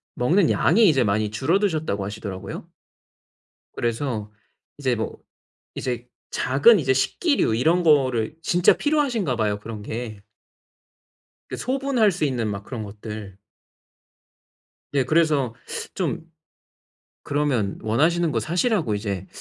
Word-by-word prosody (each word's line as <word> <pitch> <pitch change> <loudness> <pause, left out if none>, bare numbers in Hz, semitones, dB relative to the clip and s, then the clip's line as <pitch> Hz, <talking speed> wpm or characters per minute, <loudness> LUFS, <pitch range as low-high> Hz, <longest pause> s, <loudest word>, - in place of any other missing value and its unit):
먹는 165 +8 +3
양이 210 +6 +4
이제 135 -7 +4
많이 105 0 0
줄어드셨다고 155 - 0
하시더라고요. 100 -2 -6 1.1
그래서 115 -3 -2 0.5
이제 130 -4 0
뭐 110 - -4 0.6
이제 125 -1 -4 0.2
작은 140 - +4
이제 135 -5 +2
식기류 135 - +1
이런 160 +10 +2
거를 135 -5 +2
진짜 175 +1 +4
필요하신가 255 - 0
봐요 105 -2 0
그런 110 -1 -7
게. 110 -1 -6 1.3
그 - - -4
소분할 260 -4 +1
수 175 -4 -1
있는 125 -5 -1
막 100 0 -5
그런 115 0 -6
것들. 105 -1 -8 1.6
네. 140 -2 +3
그래서 145 -3 +2 0.4
좀 - - -2 1.0
그러면 145 -9 0
원하시는 160 +9 +2
거 - - 0
사시라고 175 - 0
이제 100 -3 -4
130 Hz, 255 characters per minute, -23 LUFS, 110-170 Hz, 1.6 s, 양이